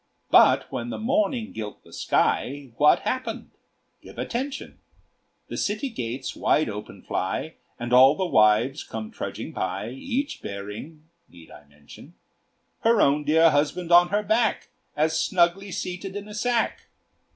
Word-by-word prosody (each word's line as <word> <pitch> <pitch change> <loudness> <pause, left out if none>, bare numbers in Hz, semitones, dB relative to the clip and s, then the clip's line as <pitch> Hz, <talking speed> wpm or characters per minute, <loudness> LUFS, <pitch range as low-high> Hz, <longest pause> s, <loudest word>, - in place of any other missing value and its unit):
But - - +6
when 120 0 -4
the - - -4
morning 260 -1 0
gilt 105 -2 -7
the - - -18
sky. 140 -1 0
What 150 +1 +5
happened? 255 +5 -4 0.5
Give - - -14
attention: 265 +4 -4 0.7
The - - -6
city 215 +7 -1
gates 130 - -5
wide 155 - +2
open 105 0 -8
fly, 95 +12 -3 0.2
And 120 +1 -4
all 130 +3 +7
the 190 - -1
wives 115 0 +3
come 110 -1 -7
trudging - - -6
by, 95 +4 -3
Each 265 - -3
bearing 105 +11 -8 0.3
need 85 -2 -16
I 75 - -14
mention? 70 0 -16 0.6
Her 230 -1 +3
own 145 -3 +3
dear 160 +2 +5
husband 155 +4 0
on 175 +1 +7
her 205 +2 0
back, 220 +2 +1 0.3
All 155 +1 +3
snugly 175 +4 +1
seated 180 +2 -5
in 205 0 -6
a 210 - -9
sack! 235 +2 -1
160 Hz, 145 wpm, -25 LUFS, -, 0.7 s, all